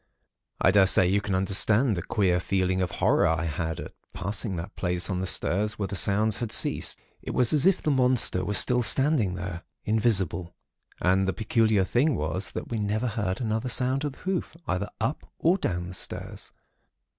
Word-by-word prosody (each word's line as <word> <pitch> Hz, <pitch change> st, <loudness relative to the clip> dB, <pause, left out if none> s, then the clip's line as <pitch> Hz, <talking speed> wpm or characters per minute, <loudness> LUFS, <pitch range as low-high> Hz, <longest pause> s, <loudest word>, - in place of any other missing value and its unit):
"I -, -, +4 dB
daresay 95 Hz, -2 st, +5 dB
you 100 Hz, +3 st, +1 dB
can 100 Hz, -2 st, -2 dB
understand 105 Hz, +5 st, +2 dB
the 85 Hz, -, -3 dB
queer 90 Hz, -2 st, 0 dB
feeling 95 Hz, 0 st, -1 dB
of 90 Hz, -, -1 dB
horror -, -, +2 dB
I 80 Hz, +1 st, -1 dB
had 80 Hz, 0 st, -4 dB
at -, -, -8 dB, 0.2 s
passing 100 Hz, +1 st, -3 dB
that 85 Hz, +4 st, -7 dB
place 90 Hz, 0 st, -2 dB
on 90 Hz, -, -2 dB
the 95 Hz, -, -3 dB
stairs 105 Hz, +5 st, 0 dB
where 100 Hz, -2 st, -3 dB
the 100 Hz, -, -5 dB
sounds 105 Hz, +2 st, +4 dB
had 115 Hz, -3 st, -4 dB
ceased. -, -, +3 dB, 0.2 s
It -, -, -6 dB
was 125 Hz, +1 st, +3 dB
as 150 Hz, +3 st, +4 dB
if 190 Hz, -, +2 dB
the 155 Hz, -, +1 dB
monster 125 Hz, -8 st, +3 dB
were 105 Hz, +3 st, -2 dB
still 125 Hz, +4 st, +3 dB
standing 130 Hz, -, +3 dB
there, 90 Hz, -2 st, -6 dB, 0.2 s
invisible. 100 Hz, -6 st, +1 dB, 0.4 s
And 95 Hz, +1 st, +1 dB
the 95 Hz, -, 0 dB
peculiar 110 Hz, -2 st, +1 dB
thing 130 Hz, +9 st, +1 dB
was 80 Hz, +6 st, -3 dB
that -, -, -6 dB
we 115 Hz, -, -3 dB
never 105 Hz, +4 st, -1 dB
heard 100 Hz, -4 st, -3 dB
another 110 Hz, +2 st, -2 dB
sound 130 Hz, +3 st, 0 dB
of 145 Hz, -2 st, -3 dB
the -, -, -19 dB
hoof, 185 Hz, -3 st, -4 dB
either 90 Hz, +3 st, -2 dB
up 150 Hz, -, -4 dB
or 175 Hz, +4 st, +1 dB
down 90 Hz, -, -3 dB
the -, -, -9 dB
stairs. -, -, -5 dB
100 Hz, 190 wpm, -26 LUFS, 90-120 Hz, 0.4 s, daresay